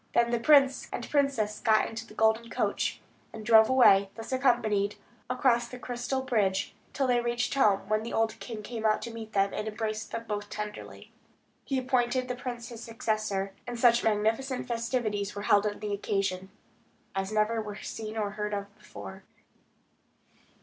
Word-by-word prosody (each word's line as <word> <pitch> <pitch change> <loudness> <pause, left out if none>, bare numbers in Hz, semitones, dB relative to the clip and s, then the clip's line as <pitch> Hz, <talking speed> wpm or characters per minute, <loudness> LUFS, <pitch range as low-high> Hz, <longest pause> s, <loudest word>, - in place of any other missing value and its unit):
Then 235 0 +3
the 240 - +1
prince 275 0 +5
and - - -4
princess 270 -8 +1
got 220 -1 +3
into 230 +1 -7
the 215 - -14
golden 220 +1 +2
coach, - - -1 0.3
and 220 -1 -9
drove 220 -1 +7
away, 200 -7 +6
thus 225 +2 -8
accompanied, 235 -6 +2 0.3
along 250 -1 +3
the 250 - -8
crystal 250 +2 -3
bridge, 205 -6 0 0.2
till 275 - 0
they 245 -1 +3
reached 240 0 -1
home, 205 -8 +3
when 215 0 +1
the 230 - -6
old 225 -1 0
king 220 -3 -7
came 225 0 -6
out 215 -1 +2
to 235 - -5
meet 220 -1 -8
them, 195 0 +2
and 215 - -3
embraced 215 0 -3
them 230 0 -4
both 205 -1 -4
tenderly. 210 0 -7 0.5
He 270 - -1
appointed 255 0 +1
the 250 - -3
prince 240 -2 -6
his 235 -1 -9
successor; 215 -4 -2
and 240 -1 -5
such 235 0 +5
magnificent 225 +5 0
festivities 230 -4 -2
were 205 - -5
held 205 0 +4
on 205 - -3
the 210 -1 -4
occasion, 195 -2 -2 0.6
as 195 +1 -2
never 215 +1 +1
were 210 -1 -6
seen 215 +1 -6
or 205 -2 -1
heard 210 0 -3
of 200 0 -6
before. - - -10
220 Hz, 175 wpm, -29 LUFS, 210-240 Hz, 0.6 s, drove